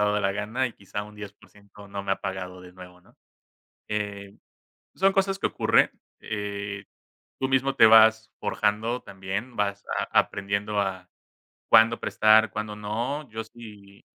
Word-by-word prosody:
dado 105 0 +2
la 95 0 +1
gana 110 +6 -1
y 120 - -7
quizá 100 +1 -6
un 105 0 -12
10% 105 0 -13
no 100 0 -5
me 95 -1 0
ha - - -3
pagado 90 -2 -5
de 90 0 -13
nuevo, 90 0 -13
¿no? - - -25 0.7
Eh, 100 -2 -4 0.6
son 195 +1 +3
cosas 195 0 +1
que - - +1
ocurren, - - +3 0.3
eh, 100 -1 -5 0.6
tú 130 - 0
mismo 135 +1 +1
te 125 - +7
vas 110 0 +6
forjando 110 +4 -1
también 100 +5 -6
vas 100 -1 -1
a - - 0 0.2
aprendiendo 100 +1 -3
a 95 -2 -3 0.6
cuándo 115 +1 +6
prestar, 110 +1 +4
cuándo 110 -1 -4
no. 120 +8 -4
Yo 110 +1 -5
sí 105 -4 -14
105 Hz, 155 wpm, -26 LUFS, 100-110 Hz, 0.7 s, te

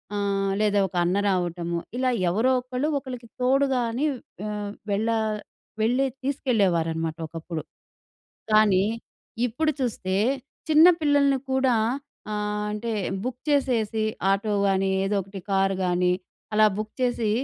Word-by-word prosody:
ఆహ్, 200 -1 0
లేదా 205 -1 +3
ఒక 180 - -13
అన్న 180 +3 +1
రావటము, 175 -2 -1 0.2
ఇలా 255 0 +2 0.2
ఎవరో 225 +9 +2
ఒకళ్ళు 255 +3 -2
ఒకళ్ళకి 250 -4 -8
తోడుగాని 260 -1 +2 0.4
ఆహ్, 210 -1 -4 0.2
వెళ్ళ 205 +3 0 0.7
వెళ్ళే 250 +5 +2 0.2
తీసుకెళ్ళేవారన్నమాట 170 - 0
ఒకప్పుడు. 165 0 -6 0.9
కానీ, 210 -3 +5 0.6
ఇప్పుడు 305 +7 0
చూస్తే 195 -6 -1 0.5
చిన్న 310 +2 +8
పిల్లల్ని 285 -2 +3
కూడా 265 -2 +3 0.6
ఆహ్, 210 0 -2
అంటే, 225 +2 -3 0.3
బుక్ 250 0 -4
చేసేసి 230 -6 +1 0.3
ఆటోగాని, 200 -1 +1 0.2
ఏదో 200 +1 0
ఒకటి 195 +1 -9
కార్‌గాని 185 -2 +2 0.4
అలా 215 0 +6
బుక్ 215 0 -5
చేసి 240 -3 +1
215 Hz, 110 wpm, -25 LUFS, 195-255 Hz, 0.9 s, చిన్న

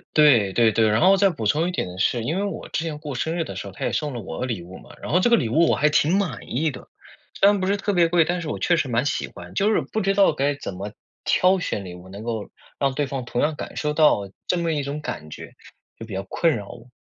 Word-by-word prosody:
对 130 -10 +5
对 115 0 +4
对， 110 0 +3
然 105 +1 +2
后 190 +2 +6
再 200 0 +4
补 115 - -5
充 155 +11 +2
一 - - -1
点， 90 - -4
是 115 +4 +1
因 155 +10 -1
为 200 - 0
我 200 - -4
之 160 - -2
前 160 -3 -4
过 150 -2 -6
生 160 +6 -2
日 165 - 0
的 - - -8
时 - - -6
候， - - -9
他 - - -4
也 - - 0
送 150 -2 -2
了 120 - -5
我 95 +5 -4
礼 115 -9 -4
物 90 +2 -11
嘛， - - -15
然 - - -5
后 175 - +4
这 215 - +3
个 235 - +6
礼 120 - 0
物 160 +8 +4
我 - - +3
还 150 +1 +3
挺 155 +4 +3
满 200 -4 -1
意 150 +5 0
的。 - - -11 0.5
虽 200 - +6
然 205 -1 +4
不 185 - -1
是 200 +1 +2
特 205 +1 -1
别 175 -2 +4
贵， 165 -1 +3
但 175 +2 -1
是 165 - -5
我 - - -3
确 175 - +2
实 150 - 0
蛮 120 +1 0
喜 145 - -1
欢， - - -12
就 205 +2 +2
是 - - +2
不 220 - -3
知 195 0 +1
道 195 -5 +5
该 145 0 0
怎 140 - -6
么 100 +3 -6 0.3
挑 185 +1 +3
选 105 - -3
礼 90 - -8
物， 90 +1 -12
能 100 +3 -9
够 115 -3 -4 0.3
让 135 -1 +1
对 145 +1 0
方 135 -2 -5
同 120 - -2
样 150 +1 +1
感 - - -7
受 150 -1 -1
到 150 -10 +3 0.2
这 180 - +1
么 170 -1 0
一 150 - -1
种 140 +2 -4
感 75 - -6
觉， - - -9 0.5
就 115 - -7
比 110 - -9
较 95 +1 -3
困 165 - +1
扰 100 -2 -8
我。 - - -12
150 Hz, 320 characters per minute, -23 LUFS, 115-175 Hz, 0.5 s, 后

